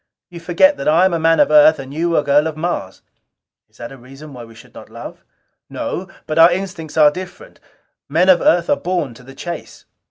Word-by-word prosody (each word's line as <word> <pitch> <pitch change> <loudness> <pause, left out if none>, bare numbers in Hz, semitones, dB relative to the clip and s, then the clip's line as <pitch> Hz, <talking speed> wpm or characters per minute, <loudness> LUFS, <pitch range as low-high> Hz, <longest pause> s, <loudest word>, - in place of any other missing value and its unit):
You 170 - -9
forget 180 - +2
that - - -5
I 165 +4 +4
am 190 - +1
a 165 - -1
man 165 +1 +2
of 290 - +3
Earth 300 +1 +6
and 135 +1 -9
you 170 +2 -1
a 150 - +1
girl 145 +2 +2
of 155 -1 -6
Mars." 155 - -5 0.7
"Is 110 - -27
that 120 +3 -9
reason 135 +4 -13
why 125 -2 -10
we 115 -1 -15
should - - -17
not - - -13
love?" - - -11 0.5
"No. 185 - -5 0.2
But 155 +1 -2
our 165 +1 +7
instincts 175 -4 -6
are 150 -1 +6
different. 185 +2 -11 0.5
Men 170 +6 +1
of 185 -3 +5
Earth 170 0 +2
are - - +1
born 175 -8 -3
to 120 - -16
the 135 +2 -15
chase." 175 -1 -9
165 Hz, 220 wpm, -17 LUFS, 140-175 Hz, 0.7 s, our